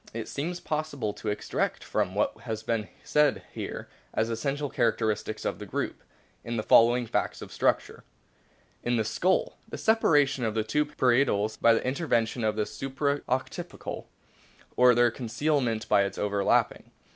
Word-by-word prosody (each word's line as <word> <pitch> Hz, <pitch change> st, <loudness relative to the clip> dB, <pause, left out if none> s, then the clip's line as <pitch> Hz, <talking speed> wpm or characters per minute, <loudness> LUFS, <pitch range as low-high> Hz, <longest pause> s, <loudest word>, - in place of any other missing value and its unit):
It 115 Hz, -, -4 dB
seems 175 Hz, +5 st, -3 dB
possible 150 Hz, -10 st, -3 dB
to 110 Hz, -, -9 dB
extract 105 Hz, -, -2 dB
from 90 Hz, -, -1 dB
what 105 Hz, -, +1 dB
has 110 Hz, -1 st, -5 dB
been 110 Hz, -2 st, -1 dB, 0.2 s
said 150 Hz, 0 st, +2 dB
here, -, -, -6 dB, 0.3 s
as 110 Hz, +1 st, +1 dB
essential 140 Hz, +5 st, -2 dB
characteristics 110 Hz, -3 st, -1 dB
of -, -, -2 dB
the -, -, -6 dB
group, -, -, -3 dB, 0.4 s
the 115 Hz, -2 st, -3 dB
following 120 Hz, +2 st, +5 dB
facts -, -, -1 dB
of -, -, -9 dB
structure: -, -, 0 dB, 0.8 s
In 120 Hz, 0 st, 0 dB
the 110 Hz, -, +2 dB
Skull. 115 Hz, -, 0 dB
The -, -, -6 dB
separation 145 Hz, -, +3 dB
of 110 Hz, -1 st, -1 dB
the 110 Hz, -, +1 dB
two 150 Hz, +8 st, +1 dB
parietals 120 Hz, -6 st, +2 dB
by 115 Hz, -1 st, +4 dB
the -, -, -2 dB
intervention 125 Hz, -4 st, 0 dB
of 110 Hz, -1 st, +1 dB
the 105 Hz, -1 st, 0 dB
supra 140 Hz, +3 st, -2 dB
occipital, 130 Hz, +1 st, -4 dB, 0.7 s
or 125 Hz, -1 st, +6 dB
their 120 Hz, 0 st, +4 dB
concealment 125 Hz, -2 st, -1 dB
by 100 Hz, -, +4 dB
its 100 Hz, -, -5 dB
overlapping. 100 Hz, -1 st, +1 dB
120 Hz, 155 wpm, -28 LUFS, 110-140 Hz, 0.8 s, or